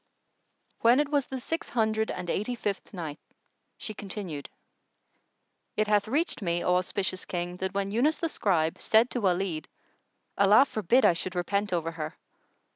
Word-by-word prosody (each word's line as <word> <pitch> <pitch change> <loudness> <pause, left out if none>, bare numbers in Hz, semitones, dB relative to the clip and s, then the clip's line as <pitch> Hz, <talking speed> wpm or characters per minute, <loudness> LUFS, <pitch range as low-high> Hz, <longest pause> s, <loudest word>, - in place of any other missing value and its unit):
When 240 +4 +5
it 295 -1 +1
was 285 -3 +1
the 265 - -4
Six 325 +6 -4
Hundred 220 -2 +1
and 180 -1 -4
Eighty 215 +8 -1
fifth 205 -4 -3
Night, 160 -5 -6 0.6
She 215 - -5
continued, 190 -7 -6 1.3
It 215 - +3
hath 210 -1 +2
reached 295 +5 0
me, 175 -2 0
O 180 0 +3
auspicious 185 0 -2
King, 175 0 -4
that 190 +1 -3
when 200 0 -1
Yunus 270 +9 +2
the 335 - -1
Scribe 165 - +1
said 225 +3 +4
to 245 - -2
Walid, 180 -4 0 0.7
"Allah 205 +6 +7
forbid 235 +1 +2
I - - +6
should 180 +2 -4
repent 200 +3 0
over 165 -2 -1
her! 155 -2 -6
200 Hz, 160 wpm, -28 LUFS, 175-225 Hz, 1.3 s, Allah